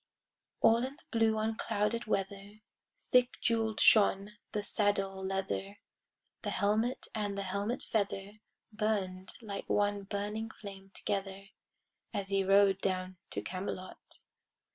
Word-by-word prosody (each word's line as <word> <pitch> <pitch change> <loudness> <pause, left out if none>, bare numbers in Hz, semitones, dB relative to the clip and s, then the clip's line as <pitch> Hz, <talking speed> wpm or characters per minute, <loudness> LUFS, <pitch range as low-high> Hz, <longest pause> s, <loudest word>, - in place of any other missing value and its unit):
All 225 - +7
in 265 +2 -3
the 330 - -23
blue 225 -1 +3
unclouded 220 +1 0
weather 200 +1 -3 0.5
Thick 250 -1 +4
jewel'd 225 -2 +1
shone 200 -1 +5 0.2
the 210 - -2
saddle 195 -2 0
leather, 195 +1 -2 0.6
The - - -2
helmet 220 +5 +1
and 205 -2 -2
the 200 - -1
helmet 200 +6 -1
feather 205 -1 -2 0.3
Burn'd 195 -4 -1
like 200 -2 -5
one 205 0 +2
burning 210 +2 -3
flame 195 -3 -10
together, 195 0 -3 0.7
As 195 -1 -2
he 195 -1 +2
rode 195 0 +5
down 185 -1 -1
to - - -3
Camelot. 185 0 -6
200 Hz, 120 wpm, -32 LUFS, 195-215 Hz, 0.7 s, All